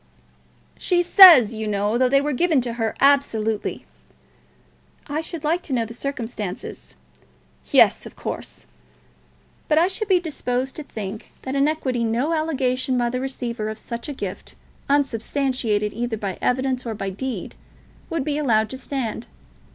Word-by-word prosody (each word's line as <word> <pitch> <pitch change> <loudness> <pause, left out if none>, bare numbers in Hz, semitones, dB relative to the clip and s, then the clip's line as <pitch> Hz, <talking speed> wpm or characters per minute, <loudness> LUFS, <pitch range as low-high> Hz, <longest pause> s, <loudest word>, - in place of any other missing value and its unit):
"She 350 -1 +2
says, 335 - +9
you 220 -1 -4
know, 205 +1 0
that 255 -1 +3
they 275 +1 +4
were 295 +1 -1
given 320 +2 +2
to 240 -1 -3
her, 225 -2 -2
absolutely." 225 -7 +1 1.2
"I 300 +1 -2
should 325 -1 -3
like 330 +4 +1
to 285 - -5
know 235 -2 +1
the 230 - -9
circumstances." 230 -7 -6 0.7
"Yes; - - +4
of - - -14
course." - - -7 1.0
"But 305 - +2
I 335 +3 +5
should 405 +3 -2
be 375 -3 +4
disposed 265 -6 -3
to 305 - -5
think 215 -5 -7
that 260 - -4
in 275 +1 +3
equity 260 -6 -1
no 240 +8 0
allegation 260 -5 0
by 240 -1 +1
the 255 +1 -2
receiver 240 -4 -4
of 215 - -6
such 235 +5 -6
a - - -3
gift, - - -7 0.3
unsubstantiated 255 -5 0
either 235 0 -3
by 195 -3 -5
evidence 260 0 0
or 230 -2 -4
by 195 -1 -4
deed, 260 +6 -5 0.6
would 330 -5 -1
be 295 +1 -1
allowed 220 -7 +2
to 260 - -7
stand. 240 -5 -4
255 Hz, 160 wpm, -22 LUFS, 225-290 Hz, 1.2 s, says